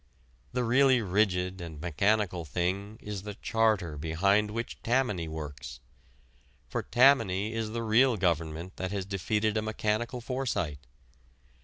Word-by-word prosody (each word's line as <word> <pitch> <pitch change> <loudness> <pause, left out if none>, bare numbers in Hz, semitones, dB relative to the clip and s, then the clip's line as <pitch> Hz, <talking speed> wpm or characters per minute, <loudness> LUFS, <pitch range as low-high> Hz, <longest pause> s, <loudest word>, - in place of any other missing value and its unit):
The 125 0 0
really 130 +2 +4
rigid 90 -2 +1
and 80 -3 -8
mechanical 90 +3 +1
thing 95 +7 -2
is 105 -2 -5
the 105 0 -7
charter 110 -9 +1
behind 100 +7 +2
which 115 +2 -5
Tammany 115 -9 0
works. 75 -6 -7 0.9
For - - -2
Tammany 115 -6 +3
is 115 -1 -2
the 115 +1 -3
real 115 +2 +4
government 85 -1 -1
that 95 0 -3
has 100 -2 -2
defeated 105 +3 0
a - - +1
mechanical 110 +3 -1
foresight. 115 - -2
100 Hz, 130 wpm, -29 LUFS, 90-115 Hz, 0.9 s, really